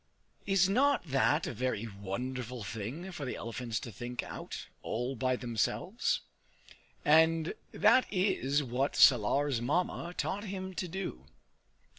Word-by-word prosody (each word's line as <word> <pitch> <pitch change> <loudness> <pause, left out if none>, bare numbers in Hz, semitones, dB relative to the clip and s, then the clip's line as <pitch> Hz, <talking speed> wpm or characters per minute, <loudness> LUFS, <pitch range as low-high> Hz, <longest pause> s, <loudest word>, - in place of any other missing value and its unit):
Is 195 -2 +4
not 275 +7 +3
that 145 +2 +2
a - - -3
very 115 -2 -1
wonderful 115 +4 -5
thing 115 - -5
for 165 -5 -6
the 130 - -3
elephants 115 0 -4
to 120 - -7
think 120 +5 -5
out, - - -7 0.2
all 125 +4 -2
by 130 +1 +1
themselves? 120 -5 -1 0.8
And 160 +2 +4 0.2
that 220 +5 +4
is 150 -7 +1
what 130 +2 -1
Salar's 130 +2 +5
Mamma 175 +5 -1
taught 205 +2 -2
him 190 -1 -5
to 180 - -3
do. 165 - -5
135 Hz, 130 wpm, -32 LUFS, 120-180 Hz, 0.8 s, Salar's